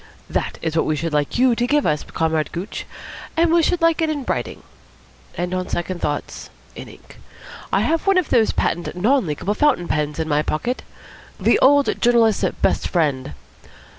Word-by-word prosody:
That -, -, -2 dB
is 160 Hz, -1 st, -2 dB
what 160 Hz, -, +1 dB
we 155 Hz, -, +1 dB
should 160 Hz, +2 st, -3 dB
like 145 Hz, -1 st, 0 dB
you 250 Hz, 0 st, +4 dB
to 240 Hz, +1 st, 0 dB
give 295 Hz, +2 st, +2 dB
us, 150 Hz, -2 st, +1 dB
Comrade 160 Hz, -1 st, -1 dB
Gooch. 180 Hz, +5 st, -6 dB, 0.5 s
And 335 Hz, 0 st, +3 dB
we 340 Hz, -, +5 dB
should 335 Hz, +1 st, 0 dB
like 330 Hz, -1 st, +3 dB
it 320 Hz, -, +1 dB
in 290 Hz, -4 st, -3 dB
writing. -, -, -3 dB, 0.7 s
And, 180 Hz, +1 st, -2 dB
on 185 Hz, 0 st, -3 dB
second 175 Hz, 0 st, -3 dB
thoughts, 145 Hz, -1 st, -4 dB, 0.3 s
in -, -, -8 dB
ink. -, -, -16 dB, 0.5 s
I -, -, +2 dB
have 325 Hz, +3 st, 0 dB
one 390 Hz, -1 st, +4 dB
of 365 Hz, -5 st, 0 dB
those 225 Hz, -3 st, +4 dB
patent 175 Hz, +1 st, -2 dB
non 225 Hz, +4 st, +2 dB
leakable 170 Hz, +7 st, -2 dB
fountain 275 Hz, -12 st, +2 dB
pens 150 Hz, -1 st, -1 dB
in 160 Hz, -1 st, -2 dB
my 150 Hz, -1 st, +2 dB
pocket. 195 Hz, +12 st, -2 dB, 0.6 s
The -, -, +3 dB
Old 285 Hz, +1 st, +3 dB
Journalist's 235 Hz, -3 st, +3 dB, 0.2 s
Best -, -, +2 dB
Friend. 140 Hz, -, -1 dB
185 Hz, 185 wpm, -21 LUFS, -, 0.7 s, we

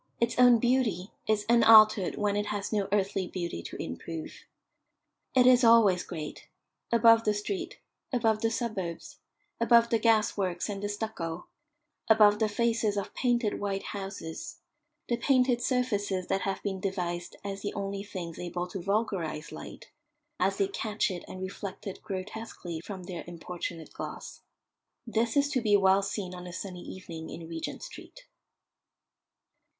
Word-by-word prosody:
Its 235 Hz, +1 st, 0 dB
own 245 Hz, -1 st, +8 dB
beauty 230 Hz, -6 st, +1 dB, 0.2 s
is 215 Hz, -1 st, +1 dB
unaltered 220 Hz, -4 st, +7 dB
when 205 Hz, -1 st, 0 dB
it 205 Hz, 0 st, -1 dB
has 205 Hz, 0 st, -3 dB
no 205 Hz, -2 st, +1 dB
earthly 195 Hz, -2 st, +1 dB
beauty 170 Hz, -, -4 dB
to -, -, -8 dB
improve. 160 Hz, -, -6 dB, 0.9 s
It 250 Hz, -1 st, +6 dB
is 250 Hz, 0 st, +6 dB
always 225 Hz, -6 st, +6 dB
great: 155 Hz, -4 st, -7 dB, 0.4 s
above 230 Hz, -1 st, +6 dB
the 210 Hz, -1 st, +1 dB
street, 205 Hz, -1 st, -4 dB, 0.3 s
above 225 Hz, -4 st, +2 dB
the 225 Hz, -, +2 dB
suburbs, 215 Hz, -8 st, -4 dB, 0.4 s
above 235 Hz, 0 st, +5 dB
the 230 Hz, -, +3 dB
gas 220 Hz, -2 st, +3 dB
works 185 Hz, -1 st, -2 dB
and 200 Hz, -1 st, -4 dB
the 205 Hz, -, -2 dB
stucco, 205 Hz, -6 st, -4 dB, 0.6 s
above 210 Hz, -1 st, +6 dB
the 220 Hz, -1 st, +2 dB
faces 225 Hz, -1 st, +1 dB
of 200 Hz, -, -3 dB
painted 240 Hz, -4 st, +1 dB
white 195 Hz, -1 st, -2 dB
houses 195 Hz, -5 st, -6 dB, 0.5 s
the 240 Hz, -, 0 dB
painted 250 Hz, -1 st, +3 dB
surfaces 205 Hz, -8 st, 0 dB
that 195 Hz, -, +1 dB
have 195 Hz, +1 st, -2 dB
been 195 Hz, -2 st, -2 dB
devised 175 Hz, -3 st, -3 dB
as 200 Hz, -1 st, -5 dB
the 205 Hz, -, -4 dB
only 200 Hz, 0 st, -3 dB
things 185 Hz, -5 st, -7 dB
able 175 Hz, 0 st, -3 dB
to 190 Hz, -, -5 dB
vulgarise 185 Hz, -6 st, -1 dB
light, -, -, -10 dB, 0.5 s
as 195 Hz, +1 st, +1 dB
they 195 Hz, -, +2 dB
catch 210 Hz, +1 st, -1 dB
it 180 Hz, -, -5 dB
and 185 Hz, 0 st, -7 dB
reflect 195 Hz, +2 st, -6 dB
it 195 Hz, -, -6 dB
grotesquely 190 Hz, -3 st, -6 dB
from 190 Hz, -2 st, -7 dB
their 175 Hz, -1 st, -6 dB
importunate 170 Hz, -1 st, -6 dB
gloss. -, -, -7 dB, 0.6 s
This 230 Hz, +1 st, 0 dB
is 285 Hz, 0 st, +4 dB
to 265 Hz, -4 st, 0 dB
be 210 Hz, -3 st, +4 dB
well 195 Hz, 0 st, +4 dB
seen 195 Hz, -2 st, -4 dB
on 180 Hz, 0 st, -8 dB
a 175 Hz, -, -8 dB
sunny 185 Hz, -1 st, -6 dB
evening 165 Hz, -4 st, -8 dB
in 165 Hz, -, -8 dB
Regent 165 Hz, -1 st, -5 dB
Street. -, -, -11 dB
200 Hz, 155 wpm, -29 LUFS, 185-225 Hz, 0.9 s, own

